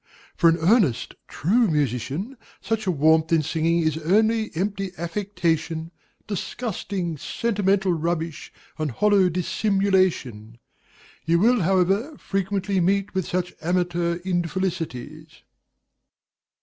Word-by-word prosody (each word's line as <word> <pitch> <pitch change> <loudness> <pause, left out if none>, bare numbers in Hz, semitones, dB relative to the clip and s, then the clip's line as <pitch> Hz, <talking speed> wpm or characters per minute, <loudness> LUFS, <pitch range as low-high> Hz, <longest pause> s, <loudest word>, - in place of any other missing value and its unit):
For 170 - +5
an 165 - +2
earnest, 175 - +2
true 225 - +2
musician, 150 - -2 0.2
such 220 -2 -2
a - - +3
warmth 160 +1 +3
in 165 -2 +3
singing 165 +2 +1
is 160 0 0
only 220 +6 +2
empty 195 +1 -2
affectation, 170 -3 -2 0.3
disgusting, 195 -4 -4
sentimental 195 0 0
rubbish, 165 -1 -3 0.3
and 155 -1 -1
hollow 195 - +3
dissimulation. 180 - 0 0.7
You 170 +1 +3
will, 230 +5 +3
however, 195 - +1
frequently 195 0 -1
meet 195 +3 +1
with 190 -2 -1
such 180 0 -2
amateur 175 0 0
infelicities. 165 -4 -3
180 Hz, 105 wpm, -24 LUFS, 160-200 Hz, 0.7 s, For